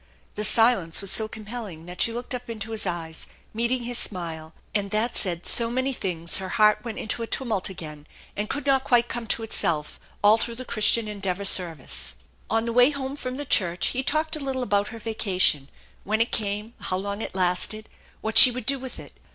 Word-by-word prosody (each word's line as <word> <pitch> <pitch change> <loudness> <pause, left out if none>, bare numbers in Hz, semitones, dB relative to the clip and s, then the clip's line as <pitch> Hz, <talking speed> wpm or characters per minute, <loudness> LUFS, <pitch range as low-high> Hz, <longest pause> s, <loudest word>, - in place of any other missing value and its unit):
The 210 - -4
silence 220 -6 +3
was 195 -1 -5
so 220 - 0
compelling 215 -6 -8
that 180 0 -6
she 230 - +5
looked 240 +3 -6
up 250 -1 -6
into 225 -1 -6
his 220 -1 -2
eyes, 165 -2 -5 0.3
meeting 235 +3 0
his 240 0 +1
smile, 165 -4 -2 0.2
and 200 -2 -1
that 220 +3 -1
said 175 -3 +2
so 230 -1 +3
many 260 +3 -1
things 170 -7 -1
her 190 -1 -6
heart 210 -1 +4
went 230 -3 -6
into 220 - -2
a 230 - -3
tumult 220 -7 -1
again 155 -5 -9 0.3
and 210 +1 -3
could 290 0 -3
not 270 -1 +2
quite 240 -3 +2
come 235 -1 -6
to 225 - 0
itself 160 -8 -2 0.2
all 215 +2 +6
through 235 0 -2
the 255 +2 -7
Christian 215 0 +2
Endeavor 200 -2 -4
service. 165 - +3 0.3
On 225 0 0
the 235 - -3
way 245 +2 +6
home 275 -2 -4
from 255 -2 -5
the 290 - -5
church 175 -7 +1
he 260 - -2
talked 310 +4 0
a - - -5
little 265 -2 -3
about 205 -2 0
her 230 - -8
vacation: 200 -10 +1 0.3
when 215 +2 -1
it 230 - +1
came, 210 +1 -1
how 185 - -2
long 200 +2 -4
it - - -6
lasted, 185 +4 0 0.3
what 220 +1 +5
she 255 - +12
would 250 -2 -6
do 275 +2 +2
with 260 -1 -7
it. - - -12
215 Hz, 210 wpm, -24 LUFS, 190-240 Hz, 0.3 s, she